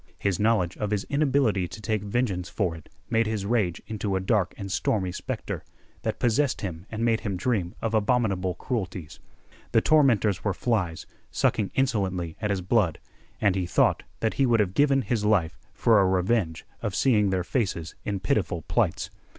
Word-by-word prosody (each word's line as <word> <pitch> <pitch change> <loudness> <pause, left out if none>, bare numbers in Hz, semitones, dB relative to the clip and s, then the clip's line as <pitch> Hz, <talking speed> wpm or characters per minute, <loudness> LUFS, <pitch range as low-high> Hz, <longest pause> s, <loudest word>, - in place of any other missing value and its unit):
His 100 -3 -1
knowledge 105 -5 +2
of 105 - -2
his 105 -1 0
inability 135 -10 +2
to 90 +4 -9
take 110 -1 -1
vengeance 100 -4 -1
for 90 -6 -1
it 80 - -13 0.2
made 115 -1 +3
his 110 -3 -2
rage 100 -6 +1
into 105 -2 -2
a - - +1
dark 95 -2 +1
and 100 -1 -6
stormy 95 -1 0
specter, - - -5 0.4
that - - -2
possessed 125 +4 +1
him 90 -1 -5
and 115 +1 -2
made 115 -1 +2
him 100 -4 -3
dream 95 -4 -1
of 115 0 -1
abominable 105 -5 +1
cruelties. 90 - -4 0.5
The 115 - +5
tormentors 120 - +3
were 100 -3 0
flies 95 -9 -1 0.2
sucking 100 -3 +1
insolently 95 -10 0
at 105 - -1
his 100 -2 0
blood, 90 -4 +2 0.4
and 100 -3 +3
he 90 -2 -1
thought - - +3 0.2
that 110 - +1
he 135 - +2
would 115 -2 +3
have 95 -3 +1
given 140 +1 +3
his 110 0 -1
life 100 -6 +2 0.2
for 110 -3 +4
a 95 - +3
revenge 95 -2 0 0.2
of 105 - -2
seeing 105 -7 +3
their 95 -1 0
faces 90 -6 -2
in 100 -2 -3
pitiful 85 -3 0
plights. - - 0
105 Hz, 180 wpm, -26 LUFS, 90-115 Hz, 0.5 s, The